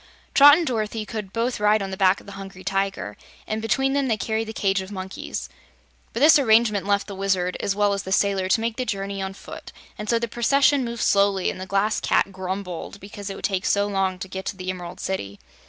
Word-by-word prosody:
Trot 290 +2 +9
and 340 - -1
Dorothy 220 -4 -2
could 210 -3 -6
both 235 +3 -1
ride 210 +1 +4
on 195 - -5
the - - -3
back 190 0 +3
of - - -18
the 200 - -10
Hungry 195 -1 -9
Tiger, 195 - -2 0.3
and 215 0 -3
between 270 +5 +1
them 280 -1 +1
they 225 -3 +1
carried 220 +1 -2
the - - -4
cage 195 -3 0
of 190 +1 -9
monkeys. 190 -1 -5 0.6
But 230 - -4
this 300 0 +7
arrangement 220 -5 +3
left 200 0 +2
the 205 - -8
Wizard, 190 -2 0
as 195 - -1
well 205 0 +2
as 200 - -2
the 190 - -7
sailor, 195 -1 +2
to 220 - +2
make 230 0 -2
the 255 - -1
journey 195 -2 -3
on 190 0 -4
foot, - - -10 0.3
and 210 0 -5
so 235 - +3
the 235 0 -2
procession 275 +4 +3
moved 235 -1 -3
slowly 200 -2 +3
and - - -9
the 190 - -6
Glass 200 +3 +1
Cat 195 - +1
grumbled 190 0 -5
because 200 0 -8
it 195 - -5
would - - -4
take 190 -2 -1
so 200 0 +2
long 195 -2 0
to 185 - -6
get 190 0 -6
to 195 - -4
the 185 0 -3
Emerald 180 0 -8
City. 100 - -4
200 Hz, 235 wpm, -24 LUFS, 190-225 Hz, 0.6 s, Trot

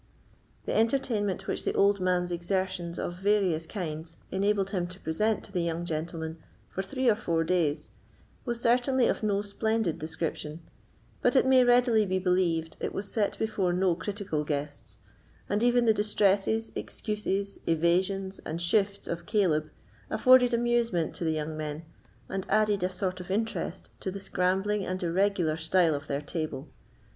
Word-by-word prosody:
The - - -2
entertainment 225 -4 +1
which - - -2
the - - -1
old 200 0 +4
man's 180 -1 +1
exertions 175 0 -2
of 175 +1 -4
various 190 -5 +1
kinds 165 -4 -5
enabled 195 0 +1
him 180 -3 -1
to 180 +2 -11
present 210 +8 0
to - - -10
the 180 -3 0
young 170 0 -2
gentlemen 160 0 -4 0.3
for 190 - -2
three 260 +6 -2
or 225 - +6
four 170 -7 0
days 160 -4 0 0.5
was 240 -2 -2
certainly 245 +2 +3
of - - 0
no 205 -2 +1
splendid 220 -3 -1
description, 160 0 -4 0.6
but - - +3
it 260 - +5
may 260 -1 +6
readily 245 -3 +4
be 185 0 +1
believed 180 -3 0
it - - -3
was 200 0 -2
set 210 -3 0
before 200 -5 0
no 180 0 +2
critical 180 -3 -3
guests; 145 -8 -4 0.5
and 205 +2 0
even 245 0 +4
the 220 - +5
distresses, 210 +1 +1
excuses, 200 -2 -3
evasions, 185 +4 +1
and 160 +2 -5
shifts 200 +3 +1
of 170 0 -4
Caleb 160 -8 +2 0.4
afforded 255 -1 +5
amusement 235 -8 +1
to - - -5
the 160 -1 +1
young 155 0 -3
men, 155 +1 -5 0.4
and 190 -1 -4
added 210 -2 +2
a 180 - +1
sort 185 0 -3
of 180 0 -9
interest 220 +4 -2
to - - -3
the 195 +1 -5
scrambling 195 +2 0
and 185 0 -3
irregular 175 -2 +1
style 165 +1 +3
of 145 +1 -4
their 140 0 -2
table. 155 -2 -4
190 Hz, 160 wpm, -28 LUFS, 165-210 Hz, 0.6 s, or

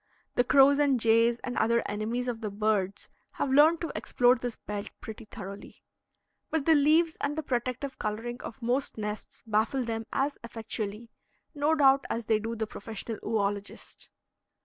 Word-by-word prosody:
The 245 - +3
crows 275 +3 +6
and 280 -4 +3
jays 230 +1 +4
and 250 - -4
other 235 +1 +2
enemies 225 +4 -2
of 240 -2 -3
the 215 - -2
birds 200 -2 -1 0.3
have 270 - -2
learned 310 +4 +6
to 335 - -3
explore 245 0 +3
this 245 -1 -4
belt 205 -1 -6
pretty 220 0 -9
thoroughly. 200 -1 -10 0.7
But 320 -3 -1
the 325 - +6
leaves 315 +3 +4
and 290 +2 -1
the 315 - -1
protective 255 +1 -3
coloring 235 +4 -4
of 235 +2 -9
most 250 +3 -1
nests 210 -1 -6
baffle 225 +4 +1
them 225 -1 -4
as 280 +1 -1
effectually, 225 -1 -5 0.4
no 300 +1 +2
doubt 275 -2 +5
as 230 -1 -2
they 220 0 +2
do 225 +2 -4
the 220 -1 -2
professional 220 +1 -6
oölogist. 205 -2 -3
235 Hz, 165 wpm, -29 LUFS, 215-270 Hz, 0.7 s, crows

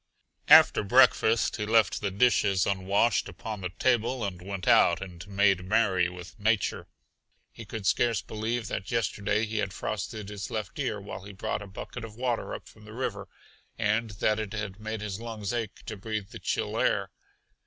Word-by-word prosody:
After - - +8
breakfast 120 0 +4
he 105 - -2
left 110 -2 +3
the 100 - 0
dishes 100 -2 +3
un 95 -1 -2
washed 105 +4 +2
upon 110 -2 -6
the 90 - -3
table 120 +3 +1
and 90 -3 -5
went 95 0 -6
out 85 0 +5
and 90 -2 -9
made 100 -2 +2
merry 95 -3 +2
with 90 +2 -11
nature. 110 -1 0 0.6
He 115 - -10
could 105 0 -6
scarce 120 +2 +2
believe 110 +1 -3
that 95 - -4
yesterday 105 -2 0
he 110 0 -3
had 95 -2 -2
frosted 105 +1 -4
his 100 -3 -6
left - - -5
ear - - -1
while - - -8
he 100 +1 -10
brought 100 - -3
a 105 - -8
bucket 95 +3 -8
of 110 -2 -8
water 120 -1 -2
up - - -10
from 105 -1 -16
the 105 - -11
river, 105 -5 -4 0.5
and 110 +1 +1
that 110 +2 +1
it 110 -2 -4
had 105 -2 -5
made 110 0 -4
his 105 -1 -4
lungs 110 -3 -5
ache 115 -4 -4
to - - -5
breathe 105 0 -4
the - - -9
chill - - -2
air. - - +1
105 Hz, 185 wpm, -28 LUFS, 95-115 Hz, 0.6 s, After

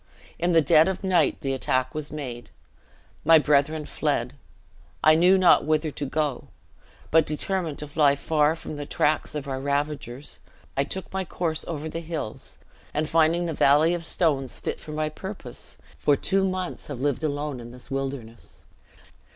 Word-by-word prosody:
In 175 +1 +1
the 165 -1 +5
dead 155 +2 +6
of 190 +1 -3
night 180 -5 +2
the 135 -1 -1
attack 130 0 0
was 150 -1 -3
made. 125 -6 -6 0.7
My 165 +1 +7
brethren 150 +1 +2
fled; - - -1 0.7
I 155 - +7
knew 180 +4 +5
not 185 -2 +5
whither 155 0 0
to 145 - -4
go; 145 -2 -2 0.6
but, 160 0 +6
determined 160 +1 -2
to 150 - -5
fly 145 -1 +3
far 150 +2 +2
from 155 -2 -8
the 145 -1 -6
tracts 150 +1 0
of 145 -1 -4
our 135 -1 -3
ravagers, 140 -2 -3 0.4
I 140 - +1
took 190 +6 -6
my 190 0 -1
course 165 -2 -2
over 160 -2 -4
the 165 - -4
hills, 160 -9 -6 0.4
and 155 +1 0
finding 165 +2 +3
the 165 - -2
valley 150 +4 +4
of 175 -1 -3
stones 145 -6 0
fit - - -4
for 155 - -9
my 155 0 -1
purpose, 155 - -6 0.2
for 145 - +3
two 195 +5 +1
months 185 -1 -4
have 140 -4 -6
lived 145 +2 -1
alone 145 -2 -2
in 120 0 -9
this 125 +2 -13
wilderness." 135 -4 -5
150 Hz, 170 wpm, -25 LUFS, 140-165 Hz, 0.7 s, My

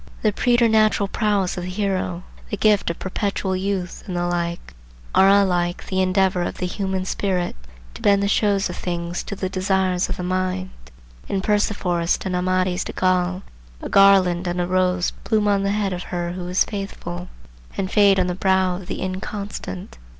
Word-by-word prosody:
The 215 -2 +3
preternatural 220 -4 +3
prowess 205 -5 0
of - - -5
the 180 - -4
hero, 185 -2 -2 0.3
the 205 - -3
gift 210 -2 +3
of 170 - -3
perpetual 195 0 -2
youth, 185 -1 -3
and 180 -2 -3
the 175 - 0
like, 170 -1 -3 0.4
are 195 - +6
alike 180 -3 +2
the 190 0 0
endeavour 185 0 +2
of 175 - -3
the 180 - -2
human 190 0 -2
spirit 185 -2 -1 0.4
"to - - -11
bend 200 -1 +4
the - - +2
shows 200 -1 +2
of - - -6
things 175 0 -3
to 200 - -6
the 190 -1 -2
desires 185 -1 0
of - - -3
the 180 - -4
mind." 185 +1 -1 0.6
In 195 - 0
Perceforest 190 -4 0
and 185 -1 -1
Amadis 185 0 +1
de - - -7
Gaul 185 0 +1 0.4
a - - -6
garland 185 -3 +5
and 175 +1 -2
a 175 - +1
rose 180 0 +1
bloom 215 -1 +1
on 200 -1 +3
the 200 - 0
head 200 -2 0
of 180 - -4
her 175 -1 -2
who 180 0 -5
is 180 +1 +2
faithful, 195 - -6 0.5
and 190 -1 -2
fade 200 -2 +5
on 185 - +2
the 180 - -1
brow 190 -1 +2
of 185 -1 -10
the - - -4
inconstant. 190 - -6
185 Hz, 185 wpm, -22 LUFS, 180-200 Hz, 0.6 s, are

